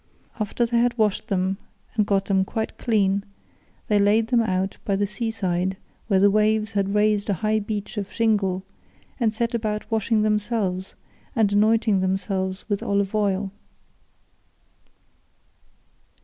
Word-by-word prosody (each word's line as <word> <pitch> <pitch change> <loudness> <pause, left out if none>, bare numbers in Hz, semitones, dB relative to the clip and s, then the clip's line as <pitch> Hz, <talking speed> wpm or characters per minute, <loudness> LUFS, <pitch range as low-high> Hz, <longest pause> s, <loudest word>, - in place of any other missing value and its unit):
After 215 +3 0
they 235 0 +1
had 240 0 +1
washed 215 -1 +1
them 190 -1 0 0.4
and 210 -2 +1
got 195 -1 +2
them 190 -1 +2
quite 220 +3 -3
clean, 200 -4 +1 0.6
they 210 -1 +3
laid 215 +3 +3
them 240 -2 +4
out 190 -3 -1
by 200 - 0
the 205 +1 +1
sea 210 +3 -3
side, 190 -3 -1 0.3
where 195 -3 +3
the 200 +1 +5
waves 215 +1 +2
had 200 -1 0
raised 210 0 +2
a 200 - +2
high 215 +5 +1
beach 210 +1 -5
of 200 -2 -3
shingle, 200 -5 +1 0.6
and 230 -3 +2
set 230 +2 -2
about 215 -1 -2
washing 220 0 +2
themselves 210 -3 -1 0.4
and 215 -4 +2
anointing 215 0 +3
themselves 190 0 -2
with 205 -2 -1
olive 200 0 0
oil. 200 -2 0
210 Hz, 145 wpm, -24 LUFS, 195-220 Hz, 0.6 s, the